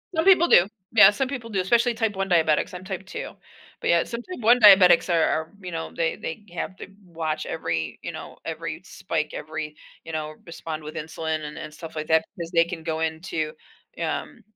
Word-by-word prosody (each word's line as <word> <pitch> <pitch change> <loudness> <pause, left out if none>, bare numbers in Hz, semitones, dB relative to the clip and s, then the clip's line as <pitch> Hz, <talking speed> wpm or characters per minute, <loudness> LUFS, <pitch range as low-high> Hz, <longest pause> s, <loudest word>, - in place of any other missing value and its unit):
Some 320 - +1
people 365 -3 +6
do. 185 - +6 0.3
Yeah, 205 -3 +9
some 260 +5 -1
people 240 -4 -5
do, 195 -3 0
especially 235 +5 +3
Type 220 -3 -1
1 195 0 -1
diabetics, 160 +1 +2
I'm 180 +1 -7
Type 190 0 -6
2. - - -6 0.5
But - - -2
yeah, 170 0 +4
some 235 0 -6
Type 365 -3 -8
1 240 +3 +5
diabetics 190 -4 +7
are 165 - +3
are, 160 +1 0
you 180 -1 -7
know, 165 0 -4
they 165 -1 0
they 165 +6 -6
have 185 - -4
to - - -9
b 195 - -21
watch 160 -3 -3
every, 80 - -3
you - - -4
know, - - -9
every - - -5
spike, - - -3
every 155 0 -5 0.3
you 165 - -8
know, 155 -1 -4
respond 160 -2 -6
with 155 - -8
insulin 160 0 -3
and 150 - -8
and 155 0 -7
stuff 160 +1 -10
like 155 0 -4
that 160 0 +3
because 170 -1 -6
they 165 -1 +4
can 170 -2 -7
go 160 -1 -2
into, 160 -1 -2 0.5
um, 230 - -4
165 Hz, 215 wpm, -25 LUFS, 160-195 Hz, 0.5 s, Yeah